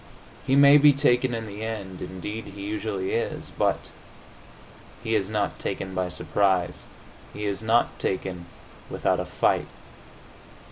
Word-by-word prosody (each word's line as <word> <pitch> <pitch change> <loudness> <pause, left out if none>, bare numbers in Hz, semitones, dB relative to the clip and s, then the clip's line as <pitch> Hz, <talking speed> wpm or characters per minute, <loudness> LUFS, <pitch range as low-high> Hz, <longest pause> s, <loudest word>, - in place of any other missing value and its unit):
He 135 - +3
may 140 +1 +8
be 145 0 +7
taken 130 -3 +2
in 115 -1 -4
the 105 0 -7
end 100 -5 -5
indeed, 95 +5 -6
he 100 0 -9
usually 105 -2 -3
is 115 - -2
but - - 0 1.1
he 110 - -1
is 100 -3 +1
not 105 -2 -1
taken 95 -1 -4
by 90 -1 -1
surprise; 95 -1 0 0.5
he 105 - -5
is 100 0 -1
not 115 +2 +2
taken 90 -2 -3 0.4
without - - 0
a - - -2
fight. - - +1
105 Hz, 140 wpm, -25 LUFS, 95-115 Hz, 1.1 s, may